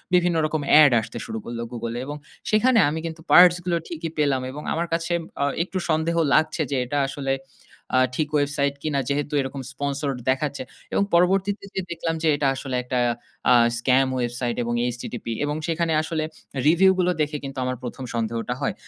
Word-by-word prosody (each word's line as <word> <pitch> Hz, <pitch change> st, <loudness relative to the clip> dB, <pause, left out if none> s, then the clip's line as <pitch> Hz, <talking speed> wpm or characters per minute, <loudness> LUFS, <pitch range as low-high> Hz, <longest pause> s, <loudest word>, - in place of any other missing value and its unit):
বিভিন্ন 175 Hz, -1 st, +3 dB
রকম 155 Hz, 0 st, -1 dB, 0.2 s
এড 145 Hz, -, +6 dB
আসতে -, -, -8 dB
শুরু 110 Hz, 0 st, -5 dB
করল 120 Hz, 0 st, -5 dB
Google 115 Hz, -1 st, -4 dB
এ, -, -, -3 dB
এবং 145 Hz, +2 st, -5 dB, 0.3 s
সেখানে 230 Hz, +3 st, +4 dB
আমি 160 Hz, +2 st, -3 dB
কিন্তু 160 Hz, 0 st, -6 dB
পার্টস 175 Hz, 0 st, +8 dB
গুলো 175 Hz, -2 st, +1 dB
ঠিকই 165 Hz, -1 st, -5 dB
পেলাম। 140 Hz, -3 st, +2 dB
এবং 150 Hz, +3 st, -8 dB
আমার 165 Hz, -, 0 dB
কাছে 165 Hz, +1 st, -2 dB, 0.3 s
আ -, -, +3 dB, 0.2 s
একটু 190 Hz, +1 st, -5 dB
সন্দেহ 160 Hz, +1 st, +1 dB, 0.2 s
লাগছে 155 Hz, +1 st, +2 dB
যে -, -, +1 dB
এটা 145 Hz, +4 st, -2 dB
আসলে 135 Hz, 0 st, -2 dB, 0.6 s
আ -, -, +5 dB, 0.2 s
ঠিক 155 Hz, +1 st, 0 dB
ওয়েবসাইট 140 Hz, -1 st, +1 dB
কিনা 150 Hz, -3 st, 0 dB
যেহেতু 145 Hz, +1 st, -1 dB
এরকম 135 Hz, +1 st, -5 dB
sponsored 140 Hz, 0 st, -2 dB
দেখাচ্ছে। 140 Hz, +1 st, -1 dB, 0.3 s
এবং -, -, +3 dB
পরবর্তীতে 190 Hz, +4 st, +2 dB
যে -, -, 0 dB
দেখলাম 165 Hz, -1 st, -2 dB
যে -, -, +2 dB
এটা 145 Hz, -1 st, 0 dB
আসলে 130 Hz, -1 st, -4 dB
একটা 125 Hz, +1 st, -2 dB, 0.5 s
আ -, -, +8 dB, 0.2 s
স্কাম 130 Hz, +2 st, +3 dB
ওয়েবসাইট 120 Hz, -1 st, -2 dB
এবং 120 Hz, 0 st, -2 dB, 0.2 s
HTTP 120 Hz, 0 st, -7 dB, 0.2 s
এবং 145 Hz, 0 st, -1 dB
সেখানে 165 Hz, 0 st, 0 dB
আসলে 160 Hz, -1 st, -2 dB, 0.4 s
রিভিউ 180 Hz, +4 st, +6 dB
গুলো 180 Hz, 0 st, +3 dB
দেখে 150 Hz, 0 st, -1 dB
কিন্তু 135 Hz, -1 st, -7 dB
আমার 130 Hz, 0 st, -2 dB
১ 125 Hz, +2 st, -6 dB
সন্দেহটা 115 Hz, +1 st, -2 dB
হয়। 135 Hz, -, 0 dB
145 Hz, 185 wpm, -24 LUFS, 130-165 Hz, 0.6 s, পার্টস